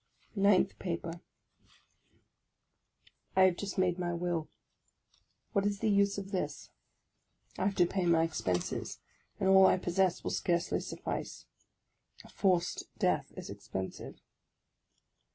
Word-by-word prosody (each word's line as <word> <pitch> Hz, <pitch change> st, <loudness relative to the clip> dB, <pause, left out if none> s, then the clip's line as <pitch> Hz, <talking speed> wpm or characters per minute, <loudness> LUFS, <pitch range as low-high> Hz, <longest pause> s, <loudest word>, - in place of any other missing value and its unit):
NINTH 200 Hz, -2 st, +3 dB
PAPER 170 Hz, -1 st, -4 dB, 2.1 s
I 190 Hz, -, +5 dB
HAVE 185 Hz, -2 st, +4 dB
just 200 Hz, -1 st, -5 dB
made 180 Hz, -1 st, +1 dB
my 175 Hz, -1 st, -1 dB
will; 170 Hz, -2 st, -2 dB, 1.0 s
what 200 Hz, -3 st, +2 dB
was 205 Hz, 0 st, 0 dB
the 215 Hz, +1 st, +1 dB
use 200 Hz, 0 st, +3 dB
of 195 Hz, 0 st, -6 dB
this? 185 Hz, -, -3 dB, 0.9 s
I -, -, +1 dB
have 195 Hz, 0 st, +1 dB
to 175 Hz, -, +5 dB
pay 180 Hz, 0 st, -1 dB
my 165 Hz, -1 st, +4 dB
expenses, 90 Hz, -, -2 dB, 0.4 s
and 195 Hz, -, +1 dB
all 190 Hz, 0 st, +8 dB
I -, -, +4 dB
possess 180 Hz, 0 st, +1 dB
will -, -, -2 dB
scarcely 170 Hz, -1 st, 0 dB
suffice. -, -, -5 dB, 0.8 s
A -, -, -14 dB
forced 180 Hz, -3 st, +1 dB
death -, -, +1 dB
is -, -, -7 dB
expensive. 95 Hz, 0 st, -6 dB
185 Hz, 125 wpm, -32 LUFS, 170-195 Hz, 2.1 s, all